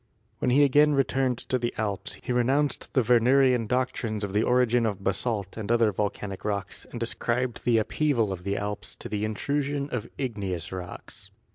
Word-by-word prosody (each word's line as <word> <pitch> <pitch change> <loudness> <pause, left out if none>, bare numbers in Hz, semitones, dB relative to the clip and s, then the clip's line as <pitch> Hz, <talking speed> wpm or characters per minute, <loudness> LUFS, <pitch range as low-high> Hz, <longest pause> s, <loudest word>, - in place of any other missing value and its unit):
When - - +1
he 140 +4 +5
again 145 +2 +5
returned 135 -2 +1
to 130 - -2
the 120 0 -2
Alps 105 -3 -2
he 125 - -1
re 125 - +3
nounced 140 +3 0
the 130 - +3
Wernerian 125 0 +4
doctrines 115 -3 -1
of 100 -1 -3
the 105 - +3
origin 125 -1 +3
of 100 -3 -4
basalt 100 +1 -1
and 110 0 -3
other 115 -2 +4
volcanic 100 -1 -3
rocks 100 -1 -3
and 120 -1 -3
ascribed 120 +1 -2
the 120 -2 +4
upheaval 115 -1 +1
of 90 -1 -8
the 100 +1 -1
Alps 105 0 -4
to - - -7
the 105 0 -2
intrusion 140 +6 -1
of 115 -2 -3
igneous 100 - -3
rocks. 90 -1 -6
115 Hz, 180 wpm, -27 LUFS, 105-130 Hz, -, he